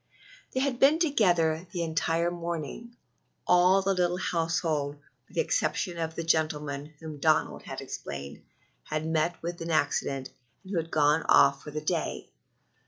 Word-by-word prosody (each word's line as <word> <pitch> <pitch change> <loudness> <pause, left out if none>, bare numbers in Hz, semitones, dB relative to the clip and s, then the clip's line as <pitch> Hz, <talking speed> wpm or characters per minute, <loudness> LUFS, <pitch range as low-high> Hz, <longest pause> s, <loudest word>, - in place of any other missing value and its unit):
They 260 - 0
had 265 -3 0
been 290 +4 +6
together 175 - +2
the 175 -4 -2
entire 165 +1 0
morning 170 - -5 0.5
all 180 +2 +5
the 195 +1 +2
little 180 -1 +1
household, 160 -5 -1 0.3
with - - -19
the - - +3
exception 175 -2 -1
of 160 -1 -3
the 165 - -3
gentleman 150 -2 -1
who, 155 -2 -8
Donald 155 +1 +2
had - - -7
explained, 70 0 -7 0.4
had 155 0 -3
met 160 +1 +1
with 170 +1 -4
the 165 0 -4
accident, 140 -3 0 0.3
and 190 - -10
who 190 - -1
had 165 0 -2
gone 150 +1 +3
off 140 0 +6
for - - -9
the 155 +1 -4
day. - - -2
165 Hz, 160 wpm, -28 LUFS, 155-175 Hz, 0.5 s, been